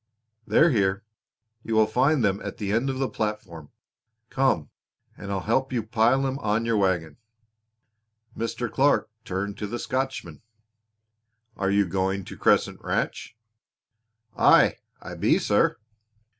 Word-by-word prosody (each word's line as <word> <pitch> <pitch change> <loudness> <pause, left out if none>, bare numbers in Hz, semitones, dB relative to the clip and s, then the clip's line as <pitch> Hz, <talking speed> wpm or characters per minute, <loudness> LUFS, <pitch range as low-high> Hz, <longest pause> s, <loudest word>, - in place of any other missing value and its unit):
"They're 165 +1 +4
here. 95 -4 +1 0.6
You 115 - -2
will 110 0 +5
find 130 +5 +2
them 100 0 0
at - - -6
the 100 -2 -3
end 115 +5 +1
of 130 - -3
the 135 0 0
platform. 105 - -5 0.6
Come, 130 - +1 0.4
and 100 - -8
I'll 95 -1 -2
help 130 +6 0
you 120 -3 -1
pile 115 +4 +2
them 135 0 -2
on 110 -1 0
your 115 -1 +1
wagon." 90 -5 0 1.2
Mr. 115 +1 -3
Clark 130 0 +1
turned 100 -1 -4
to 105 - -3
the 120 +4 -4
Scotchman. 130 +2 -4 1.1
"Are 95 - -1
you 100 0 +3
going 95 +1 -2
to - - -9
Crescent - - +1
Ranch?" 115 - -3 1.0
"Aye, - - +5 0.2
I - - -9
be, - - +2
sir." - - +1
110 Hz, 140 wpm, -25 LUFS, 100-130 Hz, 1.2 s, will